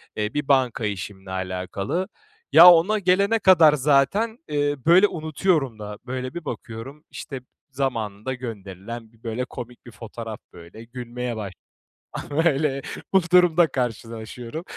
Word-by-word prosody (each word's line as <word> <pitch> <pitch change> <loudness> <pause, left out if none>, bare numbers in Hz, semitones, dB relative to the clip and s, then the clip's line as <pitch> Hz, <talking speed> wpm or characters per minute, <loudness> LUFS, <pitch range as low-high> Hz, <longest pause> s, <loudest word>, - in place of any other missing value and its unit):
eee, 105 0 -2
bir 145 -1 -2
banka 130 -5 +2
işimle 95 -1 -6
alakalı. 95 - -3 0.4
Ya, 175 +2 +10
ona 185 +6 +3
gelene 200 +4 +2
kadar 170 -7 +6
zaten, 150 - +2
eee, 145 -1 0
böyle, 180 +5 +6
unutuyorum 155 - -1
da. 105 0 -7
Böyle, 130 0 -5
bir 175 -2 -7
bakıyorum, 125 +6 -8
işte, 135 -2 -7 0.3
zamanında 120 -3 -3
gönderilen 110 -1 -8
bir 115 -1 -27
böyle 120 +2 -3
komik 120 -1 -10
bir 120 - -11
fotoğraf 115 0 -8
böyle 85 +6 -12
gülmeye 120 0 -6
başlıyorum. 100 -5 -9 0.7
Böyle, 140 -3 +1 0.3
bu 190 - +6
durumla 175 -2 +5
karşılaşıyorum. 115 +2 -5
125 Hz, 130 wpm, -23 LUFS, 110-155 Hz, 0.7 s, Ya